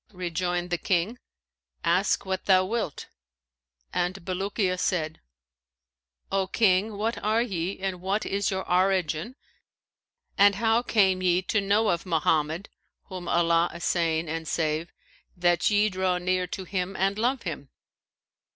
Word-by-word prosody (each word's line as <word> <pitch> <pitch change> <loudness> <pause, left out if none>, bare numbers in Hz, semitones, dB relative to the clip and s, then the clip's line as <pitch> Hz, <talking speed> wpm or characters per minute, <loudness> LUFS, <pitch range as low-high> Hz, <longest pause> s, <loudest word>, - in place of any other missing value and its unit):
Rejoined 175 0 -2
the 175 - 0
King, 195 +7 0 0.6
'Ask 180 +5 +2
what 190 0 -3
thou 185 -1 +5
wilt,' 215 -7 -3 0.9
and 180 0 -2
Bulukiya 190 0 -1
said, 160 -5 -1 1.1
'O 195 -1 +1
King, 200 0 +2
what 225 +3 -2
are 220 +3 +2
ye 190 -4 -3
and 190 -2 -4
what 195 +3 -1
is 200 0 0
your 190 -1 -3
origin 185 +2 +1 1.0
and 200 0 +6
how 225 +2 +2
came 195 -6 +2
ye 180 0 +2
to 205 +3 +1
know 205 +3 +2
of 170 +1 -1
Mohammed 160 +1 +1 0.4
(whom 185 -2 -7
Allah 170 0 +3
assain 170 -1 0
and 160 +1 -4
save!) 155 +1 -1 0.5
that 175 -1 +3
ye 210 0 +3
draw 185 -2 0
near 180 0 0
to 190 +2 -5
him 185 +1 -3
and 195 +2 0
love 250 +2 0
him?' 145 -6 -6
185 Hz, 135 wpm, -26 LUFS, 175-200 Hz, 1.1 s, and